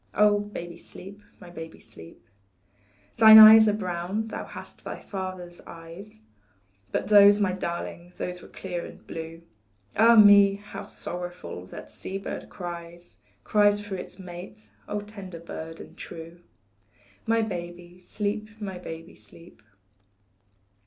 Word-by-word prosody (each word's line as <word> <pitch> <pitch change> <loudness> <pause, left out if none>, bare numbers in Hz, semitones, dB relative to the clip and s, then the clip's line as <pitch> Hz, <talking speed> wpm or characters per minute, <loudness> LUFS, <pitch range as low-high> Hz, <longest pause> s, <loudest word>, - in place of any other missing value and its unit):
Oh, 210 0 +4
baby, 175 -5 -7
sleep, 195 +4 -12 0.2
my 175 - -13
baby, 165 -1 -9
sleep. 85 -7 -15 0.9
Thine 220 -1 +10
eyes 220 0 +10
are - - +1
brown 190 +2 -3
thou - - -5
hast - - -11
thy - - -6
father's 185 -3 -7
eyes, 165 - -12 0.7
But - - -2
those, 205 0 +7
my 200 -3 +2
darling, 175 -1 -5
those 180 0 -4
were - - -13
clear 180 -2 -6
and - - -12
blue, 165 0 -8 0.5
Ah, 230 +2 +6
me! 205 -2 +7
how 205 +1 -9
sorrowfully 175 - -7
that - - -10
sea 190 - -6
bird 195 - -7
cries, 175 -1 -9 0.2
Cries 205 -1 +3
for 205 -1 -8
its 185 - -8
mate, 175 - -11 0.2
oh, 210 - -3
tender 200 -4 -9
bird 165 -1 -8
and - - -12
true; 165 +1 -10 0.9
My, 225 0 +2
baby, 175 -2 -7
sleep, 210 +3 -4
my 190 -4 -6
baby, 165 -1 -9
sleep. 170 -8 -17
185 Hz, 135 wpm, -26 LUFS, 170-205 Hz, 0.9 s, Thine